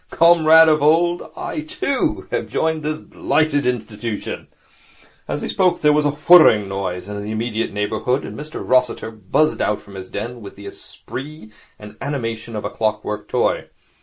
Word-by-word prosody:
Comrade 160 Hz, -1 st, +6 dB
of 155 Hz, -1 st, +3 dB
old, 170 Hz, +4 st, +3 dB, 0.2 s
I, 360 Hz, -3 st, -4 dB
too, 280 Hz, -3 st, -2 dB
have -, -, -2 dB
joined 160 Hz, -1 st, -1 dB
this 155 Hz, +1 st, -2 dB
blighted 155 Hz, -3 st, 0 dB
institution.' 115 Hz, -3 st, -4 dB, 0.8 s
As -, -, -3 dB
he -, -, -3 dB
spoke, 180 Hz, -2 st, +1 dB
there 150 Hz, -1 st, +5 dB
was 150 Hz, 0 st, +2 dB
a 145 Hz, 0 st, 0 dB
whirring 155 Hz, -, +7 dB
noise 95 Hz, -2 st, -4 dB
in 105 Hz, 0 st, -5 dB
the 105 Hz, -, -6 dB
immediate 110 Hz, +1 st, -2 dB
neighbourhood, 110 Hz, +6 st, -1 dB
and -, -, -8 dB
Mr 155 Hz, +2 st, -7 dB
Rossiter 125 Hz, -3 st, +1 dB
buzzed 110 Hz, +8 st, 0 dB
out 105 Hz, -, 0 dB
from 100 Hz, -, -15 dB
his 95 Hz, -1 st, -8 dB
den 120 Hz, +4 st, -5 dB
with 100 Hz, -, -10 dB
the 100 Hz, -, -12 dB
esprit 135 Hz, +4 st, -9 dB, 0.3 s
and 105 Hz, 0 st, -12 dB
animation 115 Hz, -5 st, -4 dB
of 105 Hz, -, -4 dB
a -, -, -3 dB
clock 110 Hz, -1 st, -1 dB
work 105 Hz, 0 st, -4 dB
toy. -, -, 0 dB
125 Hz, 170 wpm, -20 LUFS, 105-155 Hz, 0.8 s, whirring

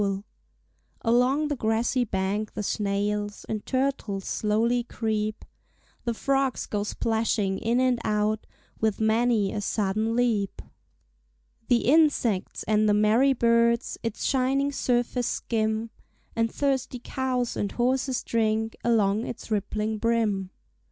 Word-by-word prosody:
Along 250 Hz, +6 st, +2 dB
the 295 Hz, -, -1 dB
grassy 230 Hz, +2 st, +1 dB
bank 200 Hz, +1 st, -2 dB
the 210 Hz, -, -3 dB
snails 205 Hz, 0 st, -2 dB
And 215 Hz, -1 st, -3 dB
turtles 255 Hz, -7 st, -1 dB
slowly 225 Hz, +3 st, +1 dB
creep; 220 Hz, -2 st, -3 dB, 0.6 s
The 235 Hz, -1 st, -1 dB
frogs 270 Hz, +1 st, 0 dB
go 205 Hz, -, -2 dB
splashing 210 Hz, -2 st, 0 dB
in 235 Hz, +2 st, +1 dB
and 255 Hz, -2 st, +2 dB
out 210 Hz, 0 st, 0 dB, 0.3 s
With 220 Hz, -2 st, 0 dB
many 220 Hz, -2 st, +2 dB
a 210 Hz, -, -2 dB
sudden 215 Hz, +2 st, 0 dB
leap. 225 Hz, -5 st, 0 dB, 1.1 s
The 240 Hz, -2 st, +3 dB
insects 265 Hz, -, +2 dB
and 215 Hz, 0 st, +2 dB
the 205 Hz, -, +4 dB
merry 220 Hz, +6 st, +4 dB
birds 235 Hz, 0 st, +2 dB
Its 230 Hz, -2 st, -4 dB
shining 270 Hz, +1 st, +1 dB
surface 245 Hz, -2 st, 0 dB
skim; 220 Hz, 0 st, -1 dB, 0.4 s
And 230 Hz, -1 st, +1 dB
thirsty 270 Hz, -3 st, -1 dB
cows 255 Hz, -2 st, -1 dB
and 200 Hz, -, -2 dB
horses 255 Hz, +1 st, 0 dB
drink 220 Hz, -1 st, 0 dB
Along 220 Hz, -2 st, +2 dB
its 230 Hz, -, -8 dB
rippling 215 Hz, +1 st, -1 dB
brim. 215 Hz, -5 st, +1 dB
225 Hz, 120 wpm, -26 LUFS, 210-245 Hz, 1.1 s, the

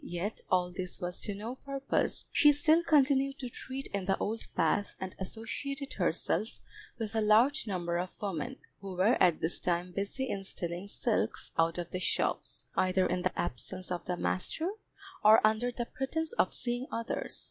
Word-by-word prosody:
Yet 175 Hz, +5 st, -3 dB
all 180 Hz, -1 st, +2 dB
this 180 Hz, 0 st, -4 dB
was 180 Hz, -1 st, -2 dB
to 205 Hz, -, -3 dB
no 225 Hz, +6 st, -5 dB
purpose, 275 Hz, 0 st, -1 dB
she 295 Hz, -1 st, +6 dB
still 315 Hz, +3 st, +5 dB
continued 275 Hz, -3 st, +3 dB
to 250 Hz, -, -5 dB
treat 265 Hz, +3 st, -6 dB
in 200 Hz, -2 st, -1 dB
the 195 Hz, 0 st, +2 dB
old 220 Hz, +2 st, -3 dB
path 205 Hz, -1 st, +1 dB
and 190 Hz, -1 st, -5 dB
associated 275 Hz, +8 st, -4 dB
herself 185 Hz, +4 st, 0 dB, 0.4 s
with 225 Hz, -2 st, -4 dB
a 220 Hz, -, +1 dB
large 230 Hz, +6 st, +4 dB
number 175 Hz, -3 st, -1 dB
of 180 Hz, +1 st, -5 dB
women, 215 Hz, +6 st, -3 dB, 0.2 s
who 195 Hz, -2 st, -7 dB
were 195 Hz, +7 st, +4 dB
at 175 Hz, -3 st, +4 dB
this 160 Hz, -, +1 dB
time 175 Hz, 0 st, 0 dB
busy 200 Hz, +8 st, -2 dB
in 200 Hz, -5 st, -3 dB
stealing 175 Hz, 0 st, -4 dB
silks 105 Hz, -, -1 dB
out 165 Hz, +1 st, +2 dB
of 175 Hz, -1 st, -4 dB
the 185 Hz, -, -2 dB
shops, 175 Hz, -, 0 dB
either 185 Hz, 0 st, +3 dB
in 180 Hz, 0 st, 0 dB
the 185 Hz, -, -1 dB
absence 180 Hz, +6 st, -3 dB
of 175 Hz, -1 st, -3 dB
the 180 Hz, -1 st, -2 dB
master, 315 Hz, -, -1 dB, 0.5 s
or 215 Hz, +1 st, +9 dB
under 220 Hz, +3 st, +2 dB
the 240 Hz, 0 st, -3 dB
pretence 310 Hz, -, -3 dB
of -, -, +2 dB
seeing 245 Hz, +2 st, -2 dB
others. 230 Hz, 0 st, -2 dB
205 Hz, 180 wpm, -31 LUFS, 180-260 Hz, 0.5 s, or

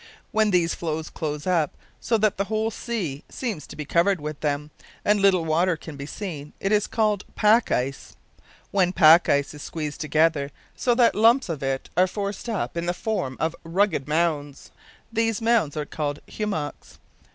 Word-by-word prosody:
When 220 Hz, 0 st, +3 dB
these 175 Hz, -3 st, +2 dB
floes 160 Hz, -1 st, -4 dB
close 150 Hz, -2 st, -4 dB
up, 170 Hz, -5 st, +1 dB, 0.2 s
so 230 Hz, -, +1 dB
that 215 Hz, -1 st, +1 dB
the 200 Hz, -, 0 dB
whole 220 Hz, +1 st, -1 dB
sea 195 Hz, -, -4 dB
seems 215 Hz, -, -4 dB
to -, -, -10 dB
be 150 Hz, -, -5 dB
covered 175 Hz, +5 st, +2 dB
with 150 Hz, 0 st, -5 dB
them, 150 Hz, 0 st, -2 dB, 0.3 s
and 205 Hz, -1 st, +3 dB
little 185 Hz, -4 st, +4 dB
water 165 Hz, +2 st, +2 dB
can 160 Hz, -1 st, -9 dB
be 140 Hz, 0 st, -7 dB
seen, 155 Hz, -7 st, -6 dB
it 195 Hz, -, -1 dB
is 210 Hz, -1 st, +3 dB
called 210 Hz, -3 st, +1 dB
"pack" 220 Hz, +2 st, +4 dB
ice. 135 Hz, +2 st, -2 dB, 0.6 s
When 190 Hz, -3 st, +3 dB
the 180 Hz, -, -4 dB
pack 160 Hz, +2 st, +7 dB
is 145 Hz, +1 st, 0 dB
squeezed 150 Hz, -2 st, -5 dB
together, 155 Hz, -2 st, +2 dB, 0.3 s
so 245 Hz, -2 st, +1 dB
that 240 Hz, -1 st, +5 dB
lumps 230 Hz, +2 st, +4 dB
of 160 Hz, -4 st, -3 dB
it 135 Hz, -1 st, -2 dB
are 180 Hz, +2 st, +4 dB
forced 200 Hz, +3 st, -4 dB
up 215 Hz, -6 st, -2 dB
in 170 Hz, 0 st, -2 dB
the 175 Hz, -, 0 dB
form 155 Hz, -, -2 dB
of 160 Hz, +1 st, 0 dB
rugged 170 Hz, -4 st, +1 dB
mounds, 150 Hz, -3 st, -1 dB, 0.4 s
these 225 Hz, -1 st, +1 dB
mounds 225 Hz, -10 st, +2 dB
are 150 Hz, -, -2 dB
called 145 Hz, -1 st, -3 dB
"hummocks." 195 Hz, -9 st, -4 dB
170 Hz, 180 wpm, -24 LUFS, 150-210 Hz, 0.6 s, pack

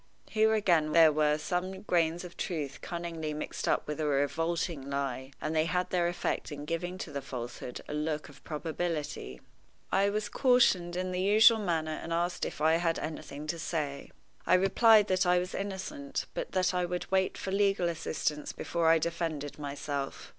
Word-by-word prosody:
Here 220 Hz, 0 st, +4 dB
again 170 Hz, -8 st, +2 dB
there 165 Hz, -2 st, +7 dB
were 150 Hz, 0 st, +2 dB
some 185 Hz, +4 st, -3 dB
grains 170 Hz, -2 st, +1 dB
of 175 Hz, -1 st, -9 dB
truth 150 Hz, -6 st, -4 dB
cunningly 165 Hz, -3 st, -4 dB
mixed 150 Hz, -, -4 dB
up -, -, +1 dB
with 150 Hz, 0 st, -4 dB
a 155 Hz, -, 0 dB
revolting 150 Hz, +1 st, -1 dB
lie, 135 Hz, -1 st, -3 dB
and 155 Hz, +1 st, -3 dB
they 155 Hz, 0 st, +3 dB
had 180 Hz, +2 st, -1 dB
their 175 Hz, -2 st, +2 dB
effect 175 Hz, -2 st, -2 dB
in 145 Hz, 0 st, -6 dB
giving 175 Hz, +3 st, -3 dB
to 170 Hz, -, -6 dB
the 140 Hz, -1 st, -4 dB
falsehood 125 Hz, -1 st, -6 dB
a -, -, -5 dB
look 150 Hz, 0 st, -2 dB
of 145 Hz, -, -16 dB
probability. 150 Hz, -, -4 dB, 0.5 s
I 195 Hz, +1 st, +3 dB
was 210 Hz, +1 st, -1 dB
cautioned 205 Hz, -10 st, +3 dB
in 185 Hz, 0 st, -2 dB
the 180 Hz, 0 st, -1 dB
usual 220 Hz, +3 st, +6 dB
manner 160 Hz, -5 st, -1 dB
and 165 Hz, -, -7 dB
asked 175 Hz, +1 st, 0 dB
if -, -, -6 dB
I 160 Hz, +1 st, +4 dB
had 165 Hz, -1 st, 0 dB
anything 150 Hz, -1 st, -6 dB
to 165 Hz, +2 st, -3 dB
say. 150 Hz, -3 st, -3 dB, 0.4 s
I -, -, +6 dB
replied 210 Hz, +3 st, +6 dB
that 185 Hz, 0 st, +2 dB
I 180 Hz, 0 st, +5 dB
was 180 Hz, +1 st, -2 dB
innocent, 205 Hz, +9 st, -4 dB
but -, -, -4 dB
that 185 Hz, 0 st, +2 dB
I 180 Hz, 0 st, +1 dB
would 175 Hz, +1 st, -3 dB
wait 190 Hz, 0 st, +1 dB
for 190 Hz, -, -4 dB
legal 195 Hz, -2 st, +2 dB
assistance 155 Hz, -2 st, -2 dB
before 170 Hz, -1 st, -1 dB
I 165 Hz, -, +6 dB
defended 160 Hz, -3 st, -3 dB
myself. 140 Hz, -1 st, -4 dB
170 Hz, 180 wpm, -30 LUFS, 150-185 Hz, 0.5 s, there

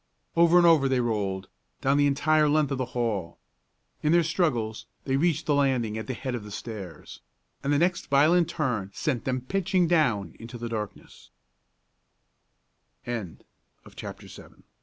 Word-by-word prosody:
Over 170 Hz, +1 st, +5 dB
and 175 Hz, -, +6 dB
over 155 Hz, -5 st, +5 dB
they 130 Hz, -1 st, +2 dB
rolled, 100 Hz, -5 st, -1 dB, 0.3 s
down 135 Hz, +1 st, +2 dB
the 145 Hz, 0 st, +4 dB
entire 150 Hz, +2 st, +3 dB
length 150 Hz, -1 st, +2 dB
of 135 Hz, -, -2 dB
the 130 Hz, -, 0 dB
hall. 100 Hz, -8 st, -2 dB, 0.6 s
In 150 Hz, -, +2 dB
their 170 Hz, 0 st, +5 dB
struggles 135 Hz, -, -1 dB, 0.2 s
they 135 Hz, -, 0 dB
reached 160 Hz, +2 st, +1 dB
the 150 Hz, -, +2 dB
landing 130 Hz, -6 st, +1 dB
at 110 Hz, -, -5 dB
the 130 Hz, -, -3 dB
head 130 Hz, +2 st, -4 dB
of 120 Hz, -3 st, -4 dB
the 105 Hz, -, -9 dB
stairs, 100 Hz, -6 st, -8 dB, 0.4 s
and 140 Hz, -, 0 dB
the 145 Hz, -, +3 dB
next 175 Hz, +3 st, +1 dB
violent 160 Hz, +5 st, +4 dB
turn 125 Hz, -, -2 dB
sent 120 Hz, +4 st, -2 dB
them 130 Hz, -1 st, -1 dB
pitching 185 Hz, +4 st, +1 dB
dow 150 Hz, -, +2 dB
135 Hz, 140 wpm, -27 LUFS, 115-160 Hz, 0.6 s, and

